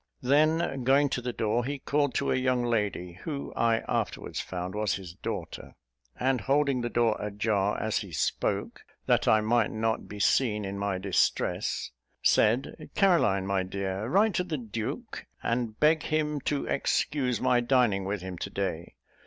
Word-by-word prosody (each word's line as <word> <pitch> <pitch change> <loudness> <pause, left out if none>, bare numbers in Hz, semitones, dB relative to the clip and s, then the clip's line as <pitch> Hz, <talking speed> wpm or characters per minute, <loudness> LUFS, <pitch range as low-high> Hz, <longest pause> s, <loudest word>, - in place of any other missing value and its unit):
Then, 150 +1 +2
going 140 +3 +4
to 125 - -2
the 125 0 -3
door, 115 +1 0
he 140 +3 -3
called 145 0 0
to - - +1
a - - +2
young 130 -1 +1
lady, 105 -6 -2
who 145 -4 -5
I 115 -1 +2
afterwards - - -2
found 90 0 -5
was 105 -1 0
his 95 -4 -8
daughter; - - -6 0.4
and, 130 -2 +1
holding 140 +1 +2
the 120 - -2
door 115 -2 +2
a 105 - -3
jar 105 -1 0
as 110 0 0
he 100 - -8
spoke, - - -1 0.2
that - - +2
I 110 0 +5
might 110 0 +2
not 110 0 -1
be 105 - -8
seen 105 -1 +2
in 100 +1 -4
my 100 -2 -1
distress, 95 0 0 0.3
said, 115 +5 +2
"Caroline, 165 - +3
my 100 -1 +1
dear, 95 +2 -3
write 200 - +3
to 180 - +1
the 170 -4 -3
duke, 115 -3 -5 0.2
and 115 -2 -1
beg 155 +1 +4
him 150 -1 -1
to 145 -1 0
excuse 135 -3 0
my 125 - +3
dining 120 -5 +2
with 95 -1 -3
him 95 -2 -6
to - - -4
day. 95 -4 -4
115 Hz, 170 wpm, -28 LUFS, 100-135 Hz, 0.4 s, I